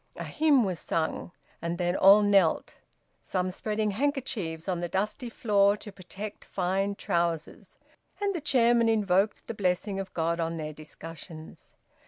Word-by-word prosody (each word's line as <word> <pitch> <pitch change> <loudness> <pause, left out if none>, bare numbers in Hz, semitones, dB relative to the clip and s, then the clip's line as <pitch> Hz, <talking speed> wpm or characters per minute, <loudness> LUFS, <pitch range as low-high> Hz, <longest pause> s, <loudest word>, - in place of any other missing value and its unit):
A - - -5
hymn 295 -5 +3
was 185 -5 -2
sung, 165 +1 -2 0.3
and 170 +1 -2
then 175 0 0
all 200 +2 +7
knelt, 195 -5 +2 0.4
some 185 -1 -2
spreading 215 +2 -1
handkerchiefs 220 - -2
on 180 -2 -1
the 175 0 -3
dusty 215 +6 -2
floor 205 -3 +3
to 210 - -10
protect 200 +3 -8
fine 195 +2 -1
trousers, 170 -4 -2 0.4
and 405 -1 0
the 340 - -3
chairman 240 -5 +3
invoked 205 -2 +1
the - - -5
blessing 195 0 -1
of 190 -1 -5
God 170 +1 0
on 165 0 -1
their 155 -1 -5
discussions. 160 +1 -11
195 Hz, 150 wpm, -28 LUFS, 170-215 Hz, 0.4 s, all